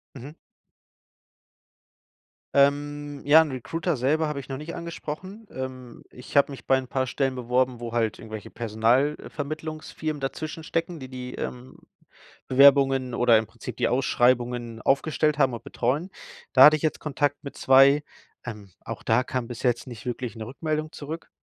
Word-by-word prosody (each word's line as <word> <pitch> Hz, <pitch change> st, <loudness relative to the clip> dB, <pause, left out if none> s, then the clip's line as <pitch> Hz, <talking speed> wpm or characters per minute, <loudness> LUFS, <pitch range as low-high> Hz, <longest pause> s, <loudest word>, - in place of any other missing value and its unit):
Mhm. 140 Hz, +4 st, -9 dB, 2.2 s
Ähm, 145 Hz, +1 st, +1 dB
ja, 150 Hz, +3 st, +8 dB
'n 160 Hz, -2 st, 0 dB
Recruiter 160 Hz, +5 st, -2 dB
selber 150 Hz, +5 st, +1 dB
habe 150 Hz, -2 st, -3 dB
ich 140 Hz, -, -8 dB
noch 135 Hz, -, -4 dB
nicht 160 Hz, +3 st, -7 dB
angesprochen. 170 Hz, +5 st, -7 dB
Ähm, 130 Hz, -2 st, -7 dB
ich 125 Hz, +3 st, -10 dB
habe 140 Hz, 0 st, +4 dB
mich 135 Hz, -, -11 dB
bei 135 Hz, -, +4 dB
'n 130 Hz, -1 st, -3 dB
paar 130 Hz, 0 st, -1 dB
Stellen 135 Hz, +1 st, -1 dB
beworben, 125 Hz, 0 st, 0 dB
wo 120 Hz, -1 st, -6 dB
halt 115 Hz, -2 st, 0 dB
irgendwelche 110 Hz, -2 st, -8 dB
Personalvermittlungsfirmen 145 Hz, +6 st, -2 dB
dazwischen 155 Hz, +4 st, -5 dB
stecken, 165 Hz, 0 st, -3 dB
die 130 Hz, -, -8 dB
die, 125 Hz, -1 st, -7 dB
ähm, 125 Hz, +1 st, -7 dB, 0.7 s
Bewerbungen 135 Hz, -1 st, +5 dB
oder 120 Hz, -2 st, +5 dB
im 110 Hz, -, -1 dB
Prinzip 115 Hz, 0 st, -9 dB
die -, -, +1 dB
Ausschreibungen 120 Hz, -2 st, +1 dB
aufgestellt 150 Hz, +2 st, +1 dB
haben 135 Hz, -3 st, +3 dB
und 115 Hz, -, -7 dB
betreuen. 145 Hz, +10 st, -1 dB, 0.4 s
Da -, -, +9 dB
hatte 150 Hz, -, +8 dB
ich 155 Hz, -, -4 dB
jetzt 155 Hz, -, -1 dB
Kontakt 145 Hz, -1 st, -1 dB
mit 140 Hz, -, -9 dB
2. 135 Hz, +2 st, +5 dB, 0.4 s
Ähm, 105 Hz, -4 st, -8 dB
auch -, -, -7 dB
da 115 Hz, +3 st, +2 dB
kam 125 Hz, -2 st, -3 dB
bis 120 Hz, -2 st, -8 dB
jetzt 125 Hz, 0 st, 0 dB
nicht 115 Hz, -4 st, -10 dB
wirklich 125 Hz, -1 st, -4 dB
'ne 110 Hz, -1 st, -6 dB
Rückmeldung 155 Hz, +4 st, -3 dB
zurück. 155 Hz, +3 st, -7 dB
135 Hz, 160 wpm, -25 LUFS, 125-150 Hz, 2.2 s, Da